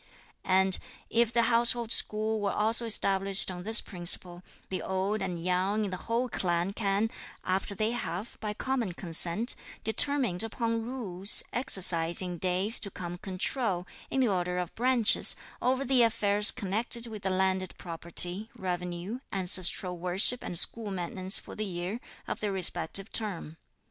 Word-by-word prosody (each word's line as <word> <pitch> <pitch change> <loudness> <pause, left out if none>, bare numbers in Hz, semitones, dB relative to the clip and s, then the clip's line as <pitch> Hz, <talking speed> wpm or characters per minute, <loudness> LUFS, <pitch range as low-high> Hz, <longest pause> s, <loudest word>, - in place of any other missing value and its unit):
And 190 0 +2 0.3
if 235 -1 +1
the 235 0 +1
household 235 0 +2
school 215 0 +1
were 200 -1 -1
also 225 +2 +1
established 195 -3 +2
on 180 -1 -8
this 220 +4 +5
principle, 175 -1 0 0.3
the 185 - -4
old 190 +3 -3
and 185 -2 -4
young 185 +5 -1
in 195 - -5
the 185 - -5
whole 235 +2 -1
clan 175 -3 -2
can, 205 +1 -1 0.3
after 190 +2 -1
they 215 +3 -1
have, 215 -3 -5
by 210 -1 -5
common 250 -8 -3
consent, 175 +7 +2 0.3
determined 235 -5 0
upon 230 0 -2
rules, 210 -6 +3
exercise 175 -8 +3
in 180 -2 -2
days 185 +5 +4
to 200 - -1
come 175 -2 -8
control, 190 0 -3 0.2
in 270 - -1
the 250 - +2
order 180 -3 -2
of 180 -2 -3
the - - -35
branches, 245 -2 +3 0.3
over 260 +2 0
the 260 -1 +2
affairs 210 -2 +3
connected 230 +2 0
with 220 -3 -9
the 190 - -2
landed 185 -1 -1
property, 175 +4 0
revenue, 180 +4 -5
ancestral 185 -1 +1
worship 185 +8 +2
and 175 - -5
school 220 +5 +2
maintenance 185 +1 -1
for - - -7
the 215 - -4
year 185 +3 -5 0.3
(of - - -5
their 210 -2 -3
respective 185 +1 +2
term.) 180 -8 -4
195 Hz, 155 wpm, -28 LUFS, 180-225 Hz, 0.3 s, this